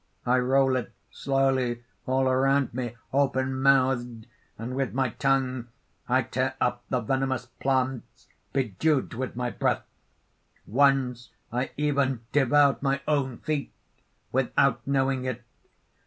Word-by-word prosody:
I 125 +1 +3
roll 130 +1 +3
it 120 -2 -5 0.2
slowly 130 -3 0 0.2
all 130 +1 +2
around 135 0 +2
me, 120 -2 -4 0.2
open 130 -1 +1
mouthed; 130 -4 +2 0.3
and 115 +3 -5
with 135 -1 -1
my 135 -1 +1
tongue 130 -1 0 0.4
I 130 +1 +3
tear 130 +3 -2
up 120 0 0
the 125 - 0
venemous 130 +1 -1
plants 130 -2 -2 0.2
bedewed 135 +3 0
with 130 +1 -4
my 120 0 -2
breath. - - 0 0.8
Once, 130 -1 +2 0.2
I 125 +2 -1
even 140 -4 +1
devoured 145 0 +4
my 140 0 0
own 135 -5 0
feet 155 -3 -2 0.6
without 130 -1 +2
knowing 135 -1 +1
it! 125 -2 -4
130 Hz, 125 wpm, -27 LUFS, 125-135 Hz, 0.8 s, devoured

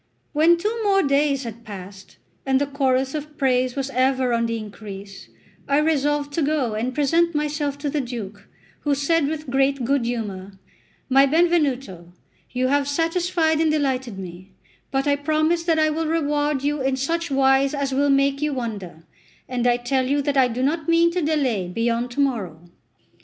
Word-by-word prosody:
XCIII - - -45
WHEN 325 +3 +5
two 435 +6 -2
more 390 -1 +3
days 280 -1 +1
had 230 0 -8
passed, 195 -2 -10 0.3
and 265 -1 +2
the 285 - +1
chorus 270 -2 0
of 300 0 -6
praise 255 -2 +1
was 275 -1 -3
ever 260 -1 +1
on 230 0 +1
the 230 0 -2
increase, 200 -2 -9 0.4
I 280 - +2
resolved 295 -1 +1
to 330 - 0
go 285 -6 0
and 240 +4 -3
present 330 +3 +2
myself 295 -1 -1
to 290 0 -3
the 295 - 0
Duke, 230 -5 -7 0.3
who 290 -1 0
said 285 +2 +1
with 305 -3 -4
great 270 -1 +1
good 275 -1 +1
humour: 205 -5 -4 0.5
"My 270 +1 +5
Benvenuto, 275 - 0 0.4
you 255 +1 -1
have 285 0 +1
satisfied 330 +1 +1
and 320 - +3
delighted 260 -7 -1
me; 185 0 -9 0.4
but 270 +1 -1
I 285 - +3
promise 310 +3 +1
that 330 -2 +2
I 310 0 +3
will 320 +1 -2
reward 295 -3 0
you 290 0 0
in 265 0 +1
such 330 +5 -2
wise 270 +1 +3
as 280 -1 -2
will 285 +2 +2
make 275 0 +2
you 300 -1 0
wonder; 200 -10 -6 0.4
and 245 -1 -1
I 240 0 +3
tell 255 +1 -1
you 285 +1 +1
that 285 0 -1
I 265 -2 +5
do 250 +1 -3
not 310 +3 -1
mean 335 0 +4
to 360 +1 -1
delay 270 - 0
beyond 230 +5 -1
to 285 - -5
morrow." 180 - -3
275 Hz, 185 wpm, -22 LUFS, 245-300 Hz, 0.5 s, WHEN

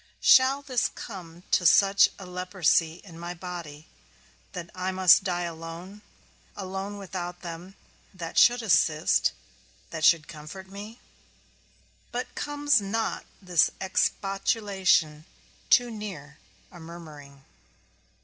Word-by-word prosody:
Shall 265 +2 +5
this 255 -4 0
come 175 -5 -10
to 215 -5 +3
such 195 +3 +5
a 195 - -10
leprosy 180 -2 0
in 170 -4 -13
my 175 +1 -6
body 170 -4 -8 0.7
that 175 -2 -7
I 185 +1 -3
must 185 -1 +6
die 175 -2 -1
alone; 170 +4 -8 0.6
alone 195 +1 -5
without 180 -2 -6
them 175 +2 -8 0.4
that 170 -4 -8
should 245 0 +5
assist, 160 -7 +3 0.6
that 160 -1 -5
should 160 -1 +5
comfort 155 +5 -10
me? 205 +4 -10 1.1
But 245 +1 -4
comes 290 -4 +1
not 220 +3 -3 0.2
this 175 -4 +3
expostulation 190 -5 0 0.4
too 245 -1 +4
near 185 -10 -8 0.3
a 175 - -13
murmuring? 150 -5 -12
180 Hz, 110 wpm, -27 LUFS, 165-200 Hz, 1.1 s, must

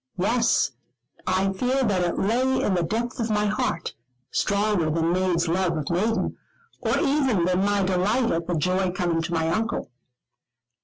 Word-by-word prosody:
Yes, 230 +6 +2 0.6
I 190 +1 +1
fear 255 +7 0
that 200 -6 +1
it 175 -1 -1
lay 255 +6 +1
in 200 - +1
the 180 - +1
depth 230 +9 -2
of 230 -1 -1
my 210 -1 +1
heart, 205 -5 -1 0.4
stronger 200 -5 +1
than 165 +2 +1
maid's 180 -2 +1
love 170 0 0
of 150 0 -3
maiden, 215 +6 0 0.4
or - - +1
even 265 - +2
than 185 +1 +1
my 205 0 +2
delight 190 +6 +1
at 165 0 -2
the 175 - 0
joy 185 +4 +1
coming 175 -3 -1
to 165 +1 -4
my 160 -1 +1
Uncle. 225 - -2
190 Hz, 165 wpm, -24 LUFS, 175-220 Hz, 0.6 s, Yes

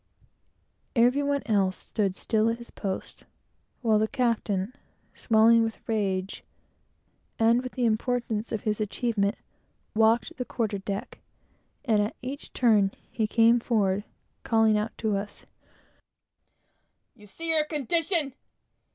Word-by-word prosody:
Every 245 +4 +4
one 285 0 0
else 195 -4 +1
stood 200 -4 -2
still 220 +2 +1
at 230 - -1
his 235 0 -12
post, 190 -2 -6 0.6
while 220 -2 +3
the 220 - +2
captain, 225 -4 -1 0.4
swelling 230 0 +4
with 225 -1 -3
rage 195 -4 -1 0.9
and 230 +2 +4
with 255 0 -7
the 250 - 0
importance 230 -1 -1
of 220 - -2
his 215 0 -1
achievement, 210 -1 0 0.6
walked 220 +1 +2
the 250 - -2
quarter 220 -4 -2
deck, 195 0 -5 0.7
and 220 -5 +3
at 205 +1 -1
each 275 +3 -6
turn, 215 -5 +3
as - - -34
he 220 -2 0
came 230 +2 +4
forward, 205 -4 +1 0.4
calling 225 -1 +3
out 210 +1 -2
to 215 -2 0
us, 200 +1 -6 1.7
"You 210 -3 -17
see 330 +12 -4
your 315 -2 +3
condition! 305 - -1
225 Hz, 130 wpm, -27 LUFS, 210-245 Hz, 1.7 s, Every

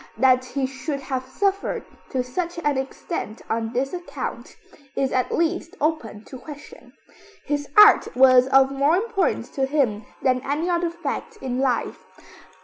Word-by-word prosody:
That 255 +1 +4
he 265 +1 -2
should 275 +2 -4
have 260 -1 -4
suffered 395 +6 -1 0.2
to 255 -2 -1
such 340 +8 -4
an 295 -1 +1
extent 265 - -5
on 225 0 -1
this 265 +5 -2
account, 350 -1 -6 0.4
is 270 -1 0
at 255 -1 0
least 335 0 -1
open 285 -9 -2
to 260 - -10
question. 290 +1 -12 0.5
His 290 -1 -2
art 420 0 +8
was 255 0 +6
of 270 0 +5
more 280 +4 +2
importance 390 0 0
to 270 -1 -1
him 245 -8 0 0.2
than 255 -1 +2
any 295 +5 -1
other 345 0 +1
fact 355 +7 -5
in 255 -8 -3
life. 260 -3 -1
275 Hz, 150 wpm, -23 LUFS, 255-330 Hz, 0.5 s, art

